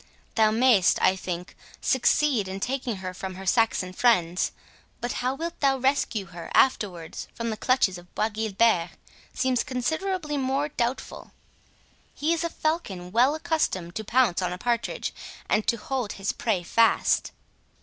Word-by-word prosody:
Thou 220 -2 +4
mayst, 220 -4 +4
I 190 - +4
think, 180 -1 -6 0.2
succeed 260 -3 +2
in 190 +1 -5
taking 250 0 -2
her 185 - -4
from 190 0 -6
her 190 +1 -8
Saxon 190 -3 +1
friends, 185 -7 +2 0.5
but 240 - -3
how 255 +2 0
thou 335 +3 -3 0.2
wilt 265 - -8
rescue 260 -6 +1
her 170 -2 -9
afterwards 180 -10 +1
from 230 -1 -3
the - - -2
clutches 215 -6 +1
of 175 0 -19
Bois 215 - +1
Guilbert 215 -4 +1 0.5
seems 260 -2 +1
considerably 300 +4 -2
more 270 +2 0
doubtful—He 270 +4 -5
is 335 0 -1
a 335 - -1
falcon 205 - -3
well 250 +7 +4
accustomed 250 - -1
to 220 - -4
pounce 230 -5 +2
on 180 -1 -1
a 180 - -4
partridge, 235 +4 -2 0.3
and 210 - +1
to 235 - +2
hold 250 -1 -3
his 195 +1 -2
prey 205 -6 -1
fast." 230 +6 +2
230 Hz, 150 wpm, -26 LUFS, 190-265 Hz, 0.5 s, Thou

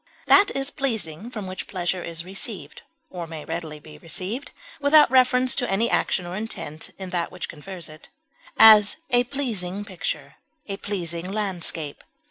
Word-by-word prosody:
That 400 0 +6
is 275 +1 0
pleasing 220 - -2
from 215 -5 -6
which 185 0 -6
pleasure 180 -1 -2
is 170 0 -4
received, 190 -5 -4 0.3
or 175 -2 -5
may 160 -2 -8
readily 160 -2 -5
be 150 +1 -13
received, 190 - -4 0.3
without 295 0 +6
reference 255 -1 +4
to 245 - +1
any 220 +5 +1
action 180 - +1
or 175 +1 -5
intent 190 -8 -5
in 190 -2 -7
that 175 -2 -1
which 180 - -5
confers 175 +3 -7
it; 155 0 -13 0.5
as, 215 -2 +8 0.2
a 245 0 +4
pleasing 205 -8 -3
picture; 190 -4 -4 0.3
a 195 -1 -5
pleasing 180 -3 -3
landscape. 175 -7 -1
190 Hz, 155 wpm, -24 LUFS, 170-230 Hz, 0.5 s, as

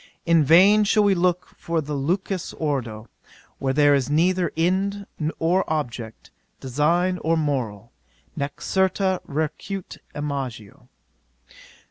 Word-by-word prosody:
"In 165 -2 +4
vain 190 +8 +6
shall 210 +1 +3
we 200 -1 +4
look 180 -1 0
for 165 -1 -1
the 150 -1 -4
lucidus 180 +6 -2
ordo', 120 -8 -3 0.5
where 135 - 0
there 145 +1 +4
is 140 -1 +1
neither 175 +4 +2
end 195 +4 0 0.3
or 175 +4 +2
object, 120 -7 -4 0.3
design 170 +8 +1
or 165 +1 +1
moral, 120 -8 -2 0.4
nec 140 0 -5
certa 190 0 +1
recurrit 160 +6 -4 0.2
imago." 135 -8 -5
160 Hz, 115 wpm, -23 LUFS, 140-185 Hz, 0.5 s, vain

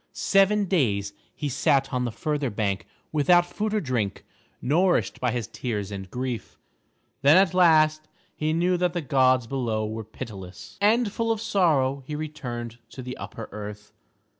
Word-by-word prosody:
Seven 200 +1 +3
days 105 - 0 0.2
he 150 - -3
sat 135 0 +1
on 125 -1 0
the 120 - -2
further 145 +2 -2
bank 100 -3 -2 0.2
without 175 +4 +4
food 215 +4 -3
or 215 - +1
drink, 125 - -2 0.3
nourished 175 +8 +1
by 125 - +2
his 120 -2 -2
tears 105 -5 -4
and 95 -1 -6
grief. 125 -3 -4 0.6
Then 145 +5 +7
at 190 -3 +4
last 155 -3 +4 0.3
he 155 +1 -1
knew 175 +3 +2
that 175 -1 0
the 175 - -1
gods 130 -3 +3
below 115 -4 -1
were 110 +1 -4
pitiless; 100 - -9
and 220 +1 +3
full 230 +2 -1
of 225 - 0
sorrow 155 -11 +2
he 150 - -4
returned 120 -7 -6
to 130 - -9
the 125 0 -6
upper 115 - -7
earth. 105 0 -8
135 Hz, 165 wpm, -25 LUFS, 115-175 Hz, 0.6 s, Then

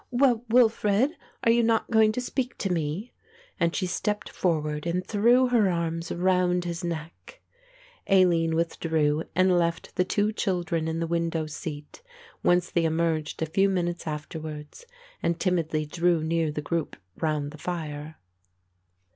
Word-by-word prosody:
"Well, 245 -2 +3
Wilfred, 225 +1 +3 0.3
are 230 - +5
you 235 +1 +4
not 225 0 +1
going 220 -1 +5
to 250 - -2
speak 250 0 -3
to 195 - -2
me?" 165 +8 -3 0.5
and 170 -1 +1
she 190 - 0
stepped 210 +3 -2
forward 155 -3 -1
and 180 +2 -1
threw 240 +5 +4
her 225 -5 +3
arms 165 -1 -2
round 180 0 +1
his 170 +1 -4
neck. 170 - -6 0.7
Aline 170 -4 +4
withdrew 160 -2 0
and 185 0 +4
left 170 -1 -2
the 180 - +4
two 205 +3 0
children 175 -6 -1
in 160 0 -2
the - - 0
window 165 -1 -1
seat, 150 - -7 0.4
whence 175 0 +2
they 170 -1 +1
emerged 160 -1 0
a - - +1
few 195 +5 +2
minutes 175 -3 -2
afterwards 155 - -7 0.3
and 170 0 0
timidly 165 -4 0
drew 170 +1 +1
near 165 -1 0
the 150 0 -4
group 165 0 -2 0.2
round 150 -2 -1
the 155 - -12
fire. 155 -2 -5
170 Hz, 150 wpm, -26 LUFS, 160-195 Hz, 0.7 s, are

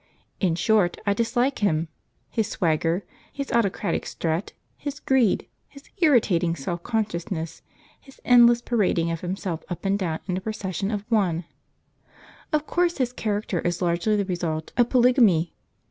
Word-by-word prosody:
In 180 -5 +1
short, 195 -1 +2
I 200 - +3
dislike 240 +5 0
him; 165 -5 +1 0.4
his 220 -2 0
swagger, 165 0 0 0.3
his 280 -1 -5
autocratic 230 -5 0
strut, 165 +3 -2 0.2
his 285 0 -6
greed, 255 -7 +2 0.2
his 280 0 -15
irritating 205 - +3
self 170 +4 -4
consciousness, 170 -6 -3 0.4
his 270 - -18
endless 240 -1 +6
parading 185 -9 +1
of 165 - -4
himself 180 -2 -4
up 175 +2 -6
and 195 +1 +1
down 165 -5 -1
in 185 -2 -2
a - - -4
procession 195 -2 -3
of 210 -2 -3
one. 180 -7 +1 1.1
Of 305 0 +1
course 350 +1 +1
his 250 -3 -1
character 205 -5 -2
is 175 +1 -1
largely 175 +4 +1
the 200 -1 0
result 170 -4 -3
of 240 -1 +3
polygamy. 235 - +4
200 Hz, 145 wpm, -24 LUFS, 170-235 Hz, 1.1 s, endless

